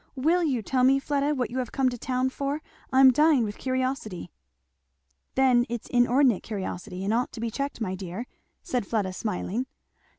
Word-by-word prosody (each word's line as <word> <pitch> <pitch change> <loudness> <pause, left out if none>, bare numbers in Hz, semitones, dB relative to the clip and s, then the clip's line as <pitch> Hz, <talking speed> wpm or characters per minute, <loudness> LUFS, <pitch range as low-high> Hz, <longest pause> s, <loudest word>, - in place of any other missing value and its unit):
"Will 320 +7 +2
you 260 -8 0
tell 255 +4 +1
me, 265 +2 +5
Fleda, 285 +1 0
what 250 -3 -2
you 260 - -2
have 250 -3 -3
come 265 -1 +1
to 245 - -5
town 255 +1 0
for? 280 +3 -3 0.3
I 260 0 +5
am 265 -1 +9
dying 300 -2 +4
with 210 -1 -5
curiosity." 255 - -2 1.0
"Then 255 -2 +4
it's 240 -1 -4
inordinate 245 -2 +3
curiosity, 185 -3 -5
and 205 +3 0
ought 245 +2 0
to - - -7
be 230 0 -2
checked, 275 +3 -3
my 200 -5 -2
dear," 190 +4 -5 0.4
said 250 - -2
Fleda 200 -5 -1
smiling. 215 +5 -3
250 Hz, 185 wpm, -26 LUFS, 220-270 Hz, 1.0 s, am